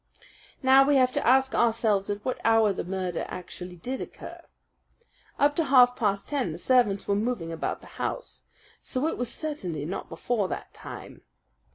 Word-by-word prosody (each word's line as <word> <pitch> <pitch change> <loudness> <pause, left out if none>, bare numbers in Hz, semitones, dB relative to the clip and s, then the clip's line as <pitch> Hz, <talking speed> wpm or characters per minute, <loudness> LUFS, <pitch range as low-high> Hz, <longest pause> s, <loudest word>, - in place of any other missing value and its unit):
"Now 265 +1 +7
we 285 +1 +3
have 255 -1 +4
to - - -1
ask 265 +1 +4
ourselves 220 -4 +2
at 205 0 -4
what 255 - -2
hour 225 -2 +4
the - - -4
murder 185 -1 -3
actually 180 0 -8
did 250 +10 -5
occur. - - -9 1.0
Up 290 +1 +3
to 330 - +2
half 250 -2 +6
past 200 -3 -1
ten 280 -4 -1
the - - -6
servants 240 -6 +2
were 200 - +2
moving 205 -5 -1
about 165 - -3
the - - -14 0.2
house; - - -4 0.4
so 260 +2 -2
it 320 - 0
was 245 -1 -2
certainly 180 - -4
not 180 +5 -5
before 225 -6 -1
that - - -6
time. - - -10
230 Hz, 175 wpm, -27 LUFS, 195-260 Hz, 1.0 s, Now